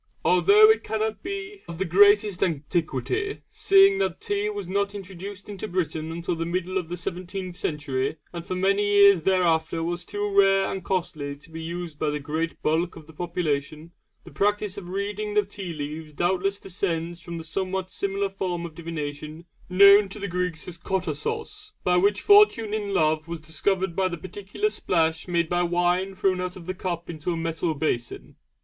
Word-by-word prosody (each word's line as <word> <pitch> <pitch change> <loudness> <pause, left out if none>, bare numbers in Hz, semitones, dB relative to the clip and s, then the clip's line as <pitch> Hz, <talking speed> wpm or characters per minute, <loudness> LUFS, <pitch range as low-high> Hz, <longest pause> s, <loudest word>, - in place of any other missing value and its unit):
Although 425 +2 +7
it 440 - 0
cannot 220 0 -2
be 395 +2 -6
of 170 - -7
the 190 - -1
greatest 205 +2 +5
antiquity, 160 - -1
seeing 395 -2 +5
that - - -1
tea 410 +1 -1
was 410 -1 -5
not 200 +1 -1
introduced 195 0 -8
into 205 0 -6
Britain 165 -4 -2
until 170 +1 -3
the 165 - -2
middle 185 +2 -1
of 175 - -6
the 175 +2 -5
seventeenth 180 +1 -5
century, 150 -6 -2 0.2
and 170 -1 -5
for 185 - -4
many 195 +2 +2
years 200 -3 +6
thereafter 165 -2 +1
was 175 +1 -3
too 205 +2 -3
rare 195 -1 +4
and 190 - -4
costly 155 -6 -2
to 150 +3 -18
be 160 0 -7
used 170 -1 -6
by 155 - +1
the 150 0 -2
great 160 +3 -3
bulk 165 +3 +1
of 160 - -11
the 160 - -15
population, 155 -2 -3 0.3
the - - -13
practice 205 -1 0
of 180 -3 -8
reading 205 +2 -3
the 210 -1 +3
tea 195 -3 -7
leaves 155 0 -6
doubtless 190 +5 0
descends 175 -3 -3
from 170 -1 -7
the 165 - -6
somewhat 185 +3 -3
similar 200 0 -1
form 180 -3 -3
of 165 - -8
divination 155 -1 -6 0.2
known 200 +2 +7
to 195 - -8
the 200 -1 -4
Greeks 180 -3 -2
as 170 -2 -7
"κοταβος" 420 - -3
by 180 - +3
which 200 +2 +3
fortune 405 - +5
in 205 -2 -2
love 155 -3 +1
was 170 -1 -5
discovered 170 +4 -1
by 190 -1 +2
the 175 -2 -4
particular 200 - -3
splash 160 - 0
made 170 -2 +1
by 175 +1 +1
wine 175 +2 +1
thrown 185 -1 +1
out 180 0 -4
of 175 -2 -11
a 185 - -2
cup 175 -2 -4
into 160 0 -5
a - - -3
metal 165 0 -1
basin. 125 -5 -3
180 Hz, 185 wpm, -25 LUFS, 165-200 Hz, 0.3 s, Although